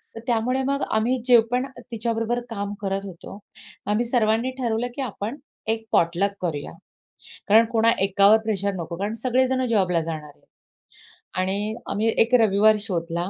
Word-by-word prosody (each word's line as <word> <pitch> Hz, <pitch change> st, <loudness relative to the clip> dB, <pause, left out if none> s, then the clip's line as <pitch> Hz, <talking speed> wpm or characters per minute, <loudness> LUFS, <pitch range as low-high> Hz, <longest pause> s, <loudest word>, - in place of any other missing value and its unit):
तर -, -, -6 dB
त्यामुळे 245 Hz, +2 st, +1 dB
मग 280 Hz, +1 st, 0 dB
आम्ही 230 Hz, +4 st, +1 dB
जे 245 Hz, -2 st, +7 dB
पण 250 Hz, +1 st, +1 dB, 0.3 s
तिच्याबरोबर 230 Hz, +1 st, -1 dB
काम 205 Hz, -3 st, -4 dB
करत 195 Hz, -1 st, -1 dB
होतो 190 Hz, +1 st, -10 dB, 0.5 s
आम्ही 220 Hz, +3 st, +1 dB
सर्वांनी 230 Hz, +1 st, +1 dB
ठरवलं, 235 Hz, -1 st, -1 dB
की 280 Hz, -, -4 dB
आपण 230 Hz, 0 st, -4 dB, 0.3 s
एक 225 Hz, 0 st, -1 dB
पॉटलक 175 Hz, +4 st, +2 dB
करूया. 155 Hz, -5 st, -3 dB, 0.8 s
कारण 220 Hz, +3 st, +6 dB
कोणा 230 Hz, 0 st, +4 dB
एकावर 200 Hz, +2 st, +5 dB
प्रेशर 200 Hz, -2 st, -1 dB
नको 170 Hz, -1 st, -5 dB
कारण 200 Hz, +4 st, -2 dB
सगळे 255 Hz, +1 st, +2 dB
जण 260 Hz, 0 st, 0 dB
जॉबला 185 Hz, -6 st, +2 dB
जाणार 155 Hz, -2 st, -6 dB
आहेत. -, -, -31 dB, 0.9 s
आणि 200 Hz, +3 st, -1 dB, 0.2 s
आम्ही 215 Hz, +2 st, 0 dB
एक 230 Hz, +2 st, +3 dB
रविवार 215 Hz, 0 st, +4 dB
शोधला. 170 Hz, -3 st, -3 dB
215 Hz, 155 wpm, -24 LUFS, 195-235 Hz, 0.9 s, जे